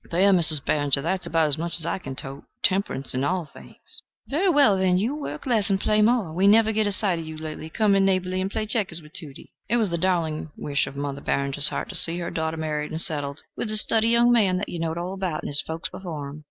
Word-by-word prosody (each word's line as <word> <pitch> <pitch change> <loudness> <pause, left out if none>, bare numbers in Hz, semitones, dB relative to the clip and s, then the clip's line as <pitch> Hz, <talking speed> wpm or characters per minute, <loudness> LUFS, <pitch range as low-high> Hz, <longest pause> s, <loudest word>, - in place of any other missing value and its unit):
"There, 190 +4 +3
Mizzes 160 -5 +6
Barringer! 145 -2 +1
there's 185 +3 -2
about 165 -1 +2
as 145 +1 -1
much 170 +1 -2
as 165 - -2
I 170 - -2
can 135 - -7
tote. 135 +1 -7 0.2
Temperance 185 -9 0
in 130 +1 -1
all 180 +3 -1
things." 145 - -9 0.3
"Very 345 +8 +1
well, 285 - +5
then, 185 -1 +2
you 230 +9 -1
work 300 - -6
less 225 -5 +1
and 195 -1 +1
play 215 +2 +2
more. 215 -7 +2
We 190 +4 +2
never 220 +1 +5
get 215 -1 +1
a - - 0
sight 190 -3 0
of 160 - -7
you 160 0 -7
lately. 155 0 -7
Come 210 +4 +2
in 195 0 +3
neighborly 185 -1 0
and 190 - -2
play 215 - -3
checkers 205 -6 -1
with 150 -2 -17
Tudie." 145 -4 -9 0.2
It 240 - +3
was 215 -6 +1
the 170 - -1
darling 165 -4 -1
wish 140 -1 -1
of 135 - -9
Mother 140 0 -4
Barringer's 140 +1 +4
heart - - -4
to - - -1
see 165 +1 +4
her 170 -1 -4
daughter 160 0 -3
married 150 -1 -3
and 160 - -5
settled 145 -3 -3
with 225 - -4
"a 215 - -1
stiddy 225 +1 +3
young 235 +1 +4
man 200 -6 +3
that 205 - -4
you 175 - -5
knowed 165 0 -2
all 175 +2 -4
about, 185 -5 -3
and - - -4
his 145 0 +2
folks 160 +2 -5
before 170 -6 -7
him." 145 +2 -10
175 Hz, 260 wpm, -24 LUFS, 155-200 Hz, 0.3 s, Mizzes